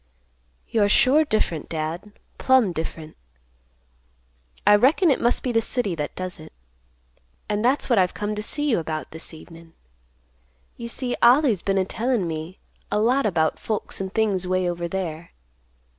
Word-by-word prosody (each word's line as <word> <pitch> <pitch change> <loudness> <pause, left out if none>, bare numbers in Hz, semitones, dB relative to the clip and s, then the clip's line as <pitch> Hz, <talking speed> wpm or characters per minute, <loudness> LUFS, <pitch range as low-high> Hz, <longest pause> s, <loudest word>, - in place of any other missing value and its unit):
You're 205 -2 +2
sure 275 +8 +5
different, 215 - -1
Dad; 165 +6 -4 0.3
plumb 260 -7 +4
different. 160 -1 -6 1.5
I 205 +1 +7
reckon 290 - +4
it - - 0
must 240 - +2
be 255 - -1
the 225 -1 +2
city 225 -4 -1
that 150 -3 -4
does 185 0 -5
it. 155 - -12 1.0
And 210 +1 -1
that's 260 +4 +2
what 235 -5 +3
I've 180 -1 +1
come 210 0 -3
to 210 - -4
see 295 +7 0
you 230 -9 +2
about 155 -1 -5
this 160 +1 -6
evenin'. 165 0 -14 1.0
You 235 - -7
see 245 +1 -3
Ollie's 245 - +5
been 195 0 0
a 190 - +2
tellin' 230 -2 -1
me 160 +3 -6 0.3
a - - +1
lot 240 +4 +2
about 160 -5 0
folks 215 -2 -3
and 190 -1 -4
things 200 -4 0
way 185 0 0
over 175 0 -3
there." 170 -3 -5
200 Hz, 160 wpm, -23 LUFS, 170-235 Hz, 1.5 s, I